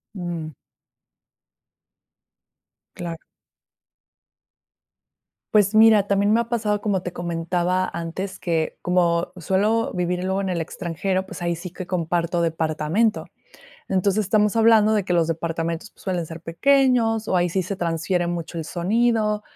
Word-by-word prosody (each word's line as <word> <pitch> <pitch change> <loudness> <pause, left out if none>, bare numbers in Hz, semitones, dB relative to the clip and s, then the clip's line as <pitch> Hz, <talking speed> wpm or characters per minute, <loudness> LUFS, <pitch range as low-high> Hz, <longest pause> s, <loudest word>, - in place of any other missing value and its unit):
Mm. 170 -4 -5 2.4
Claro. 170 -2 -6 2.3
Pues, 205 -1 +4
mira, 215 -2 +6
también 200 +1 +2
me 225 - +4
ha 235 - -5
pasado, 215 -3 0
como 200 -3 -1
te 180 - -5
comentaba 175 +2 -1
antes, 180 +3 -5
que 165 -3 -1
como 175 -1 +1
suelo 205 +6 +1
vivir 180 0 -1
luego 190 +1 0
en 190 - -2
el 175 -2 -1
extranjero, 185 +3 -2
pues, 190 - -9
ahí 170 -1 0
sí 175 +1 -8
que 180 0 -8
comparto 170 -1 -1
departamento. 160 +6 0 0.6
Entonces, 195 +2 +1
estamos 210 +2 +2
hablando 225 -1 +5
de 210 -3 +1
que 180 - -2
los 170 -2 +3
departamentos, 165 +3 -3
pues, - - -21
suelen 180 -3 -1
ser 165 +1 -9
pequeños 230 +4 +2
o - - -1
ahí 175 0 +2
sí 185 +2 -1
se 200 +2 -3
transfiere 175 0 -1
mucho 170 0 -4
el 160 - -4
sonido. 210 +5 +1
180 Hz, 140 wpm, -23 LUFS, 170-210 Hz, 2.4 s, mira